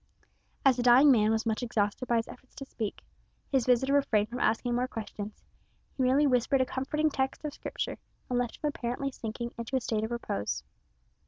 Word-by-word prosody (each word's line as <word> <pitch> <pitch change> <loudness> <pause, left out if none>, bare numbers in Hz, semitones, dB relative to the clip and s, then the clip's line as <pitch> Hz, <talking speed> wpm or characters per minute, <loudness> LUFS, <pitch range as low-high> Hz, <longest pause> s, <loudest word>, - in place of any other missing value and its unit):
As 260 -2 +5
the - - 0
dying 250 +4 +7
man 215 -4 +4
was 220 +1 +1
much 220 +1 0
exhausted 225 0 -1
by 240 - +2
his 225 - -1
efforts 255 +1 -14
to 275 - -7
speak, 220 -6 -5 0.5
his 265 -4 +2
visitor 255 +2 +3
refrained 220 -7 +2
from 245 +2 -5
asking 240 +1 +1
more 250 +1 +1
questions. 215 -3 -7 0.5
He - - -3
merely 265 +3 +4
whispered 255 0 +3
a 260 - +3
comforting 300 +4 -1
text 265 +2 -2
of 295 - -3
Scripture - - -4 0.3
and 245 -1 0
left 245 -2 -2
him 300 - -3
apparently 275 0 -2
sinking 235 0 -5
into 235 +3 -3
a - - +3
state 220 -3 -1
of 220 - -2
repose. 235 - -3
245 Hz, 195 wpm, -29 LUFS, 225-265 Hz, 0.5 s, dying